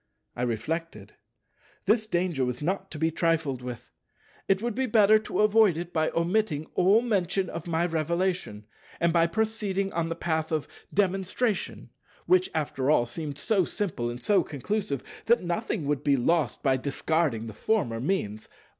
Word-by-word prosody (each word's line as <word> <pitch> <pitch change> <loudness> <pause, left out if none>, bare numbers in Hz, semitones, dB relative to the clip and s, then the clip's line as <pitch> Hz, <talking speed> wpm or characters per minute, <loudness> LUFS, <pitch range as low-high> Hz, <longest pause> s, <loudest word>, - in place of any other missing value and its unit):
I - - -4
reflected. 120 -1 -3 0.7
This 215 +2 +2
danger 175 -8 0
was 125 +2 -2
not 195 +3 -2
to 155 - -7
be 160 +2 +1
trifled 160 -6 0
with. 125 -2 -8 0.6
It 195 -1 +3
would 235 +2 -2
be 260 +3 -1
better 215 -1 +5
to 215 - -2
avoid 215 -4 +5
it 175 +1 -5
by 155 -1 +2
omitting 170 -3 +1
all 200 +5 +4
mention 195 -4 0
of 170 - -6
my 165 0 +1
Revelation, 170 - -1 0.3
and 170 -1 +2
by 170 -1 +4
proceeding 205 -1 -1
on 165 0 -1
the 165 - -2
path 160 -1 -1
of 155 -2 -1 0.2
Demonstration—which 205 - -1
after 140 -3 -1
all, 150 -6 +4
seemed 145 +4 -6
so 195 +4 +2
simple 160 - -2
and 120 +1 -7
so 200 -3 +4
conclusive 155 - -3 0.2
that 235 -2 +4
nothing 175 0 -2
would 145 -1 -1
be 140 -1 +3
lost 155 +1 +1
by 135 -2 +3
discarding 140 -2 0
the 110 - -7
former 120 - 0
means. 115 - -2
170 Hz, 160 wpm, -27 LUFS, 145-195 Hz, 0.7 s, better